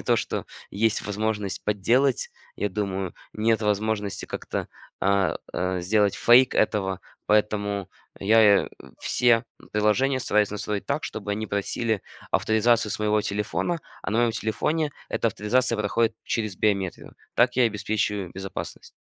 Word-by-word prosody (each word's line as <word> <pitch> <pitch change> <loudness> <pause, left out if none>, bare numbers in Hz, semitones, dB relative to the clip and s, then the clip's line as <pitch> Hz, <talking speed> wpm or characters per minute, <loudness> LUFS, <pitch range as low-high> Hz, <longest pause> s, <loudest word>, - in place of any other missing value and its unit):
не - - -7
то, - - +2
что - - -2 0.3
есть 110 +2 +1
возможность 105 -1 -2
подделать, 120 +6 +2 0.3
я 105 - -1
думаю, 95 -2 -3 0.2
нет 110 0 +1
возможности 105 -1 -1
как-то, - - -4 0.3
а, 100 0 +2
а, 90 0 -1
сделать 100 +2 +2
фейк 125 +2 +5
этого. 95 -3 +1 0.3
Поэтому 100 -2 +1 0.3
я 105 0 +5
и - - -8 0.3
все 120 -2 +3 0.3
приложения 125 +6 +2
стараюсь 105 -3 +2
настроить 105 0 -3
так, 140 +2 -1
чтобы 105 -1 -5
они 110 +2 -3
просили 105 +2 -1 0.3
авторизацию 110 0 +2
своего 105 0 +1
телефона, 105 +12 -2 0.2
а - - -3
на 110 - +1
моем 120 -1 +3
телефоне 145 +8 -1 0.2
эта 115 - +1
авторизация 115 +4 +1
проходит 110 +2 +1
через 110 -5 -2
биометрию. 100 -4 -1 0.2
Так 120 +1 +3
я 125 - +5
и 115 - +4
обеспечиваю 105 -2 -2
безопасность. 95 0 -7
105 Hz, 140 wpm, -25 LUFS, 100-115 Hz, 0.3 s, фейк